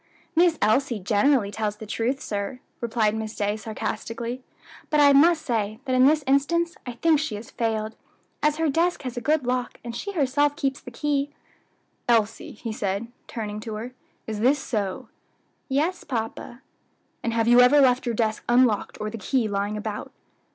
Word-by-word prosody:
"Miss 335 Hz, -1 st, +4 dB
Elsie 235 Hz, +3 st, +2 dB
generally 205 Hz, +3 st, +2 dB
tells 210 Hz, -1 st, -2 dB
the 220 Hz, -, -9 dB
truth, 235 Hz, +5 st, -1 dB
sir," 205 Hz, +4 st, -4 dB, 0.2 s
replied 225 Hz, -2 st, +1 dB
Miss 220 Hz, 0 st, -4 dB
Day, 205 Hz, 0 st, 0 dB
sarcastically, 230 Hz, +2 st, -4 dB, 0.5 s
"but 300 Hz, -, +2 dB
I 285 Hz, -1 st, +7 dB
must 320 Hz, +3 st, +5 dB
say 220 Hz, -4 st, -1 dB
that 260 Hz, -, -1 dB
in 255 Hz, +1 st, +6 dB
this 305 Hz, 0 st, +3 dB
instance 335 Hz, +6 st, +2 dB
I 245 Hz, -, -4 dB
think 310 Hz, +5 st, +3 dB
she 295 Hz, -8 st, -2 dB
has 210 Hz, +3 st, -9 dB
failed, 220 Hz, -1 st, -2 dB, 0.5 s
as 300 Hz, 0 st, +3 dB
her 325 Hz, 0 st, +1 dB
desk 335 Hz, +3 st, +1 dB
has 255 Hz, -1 st, -5 dB
a 245 Hz, -, -3 dB
good 295 Hz, +1 st, +1 dB
lock, 250 Hz, 0 st, -2 dB
and 235 Hz, -1 st, -6 dB
she 400 Hz, +11 st, -4 dB
herself 290 Hz, -2 st, +2 dB
keeps 275 Hz, -4 st, -2 dB
the -, -, -9 dB
key." 285 Hz, +3 st, -1 dB, 0.8 s
"Elsie," 225 Hz, -2 st, +1 dB
he 225 Hz, +1 st, -6 dB
asked, 200 Hz, +4 st, -1 dB, 0.2 s
turning 210 Hz, -2 st, -5 dB
to 220 Hz, 0 st, -6 dB
her, 235 Hz, +4 st, -6 dB, 0.3 s
"is 215 Hz, -2 st, -4 dB
this 260 Hz, +6 st, +4 dB
so?" 210 Hz, -9 st, -3 dB, 0.6 s
"Yes, 310 Hz, +7 st, 0 dB
papa." 240 Hz, 0 st, -5 dB, 0.6 s
"And 230 Hz, -, -1 dB
have 230 Hz, 0 st, +1 dB
you 240 Hz, +1 st, +7 dB
ever 255 Hz, +4 st, +6 dB
left 255 Hz, -2 st, +4 dB
your 235 Hz, -, 0 dB
desk 220 Hz, -1 st, 0 dB
unlocked, 240 Hz, -4 st, +3 dB
or 215 Hz, 0 st, -3 dB
the 230 Hz, -, -6 dB
key 240 Hz, +2 st, 0 dB
lying 205 Hz, +1 st, -2 dB
about?" 210 Hz, 0 st, -5 dB
240 Hz, 180 wpm, -25 LUFS, 215-280 Hz, 0.8 s, I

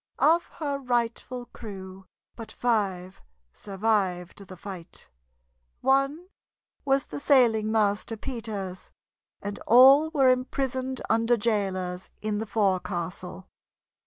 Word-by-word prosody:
Of 335 Hz, +3 st, +3 dB
her 285 Hz, -3 st, -3 dB
rightful 245 Hz, 0 st, -2 dB
crew 190 Hz, -3 st, -9 dB, 0.3 s
but 225 Hz, -2 st, -9 dB
five 195 Hz, -6 st, -1 dB, 0.3 s
survived 195 Hz, -2 st, -2 dB
the 185 Hz, -, -11 dB
fight; 185 Hz, -3 st, -10 dB, 0.7 s
one 275 Hz, +6 st, +1 dB, 0.5 s
was 275 Hz, 0 st, +1 dB
the -, -, -7 dB
sailing 235 Hz, -7 st, +3 dB
master, 215 Hz, +1 st, 0 dB
Peters, 210 Hz, -7 st, -6 dB, 0.5 s
and 205 Hz, 0 st, -5 dB
all 270 Hz, +6 st, +7 dB
were 275 Hz, -5 st, +3 dB
imprisoned 260 Hz, 0 st, -2 dB
under 230 Hz, +2 st, +2 dB
jailers 190 Hz, -5 st, -2 dB
in 215 Hz, -1 st, -2 dB
the 220 Hz, -, -4 dB
forecastle. 185 Hz, -3 st, -2 dB
220 Hz, 100 wpm, -26 LUFS, 195-255 Hz, 0.7 s, all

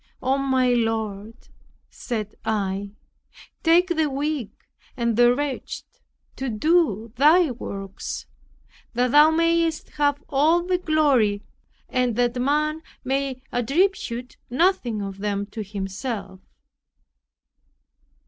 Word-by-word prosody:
"Oh, 265 Hz, +1 st, +1 dB
my 260 Hz, -2 st, +2 dB
Lord," 225 Hz, -2 st, -1 dB, 0.6 s
said 215 Hz, -4 st, -4 dB
I, 200 Hz, -1 st, -2 dB, 0.7 s
"take 340 Hz, +2 st, +4 dB
the 315 Hz, -2 st, +1 dB
weak 280 Hz, -3 st, -2 dB, 0.5 s
and 235 Hz, -2 st, 0 dB
the 240 Hz, +1 st, +5 dB
wretched 285 Hz, -1 st, -4 dB, 0.5 s
to 265 Hz, -1 st, -3 dB
do 230 Hz, -, +1 dB
thy 310 Hz, +3 st, +5 dB
works, 195 Hz, -5 st, -6 dB, 0.7 s
that 250 Hz, 0 st, +2 dB
Thou 295 Hz, +2 st, +7 dB
mayest 330 Hz, 0 st, +1 dB
have 290 Hz, 0 st, +1 dB
all 310 Hz, +5 st, +3 dB
the 360 Hz, 0 st, 0 dB
glory 275 Hz, -, +2 dB, 0.4 s
and 250 Hz, -3 st, 0 dB
that 245 Hz, +1 st, +1 dB
man 305 Hz, +3 st, +1 dB, 0.2 s
may 270 Hz, -1 st, -2 dB
attribute 250 Hz, -, 0 dB
nothing 250 Hz, -, +1 dB
of 195 Hz, 0 st, -6 dB
them 205 Hz, 0 st, -1 dB
to 220 Hz, -, -5 dB
himself. 195 Hz, 0 st, -5 dB
255 Hz, 105 wpm, -24 LUFS, 215-300 Hz, 0.7 s, Thou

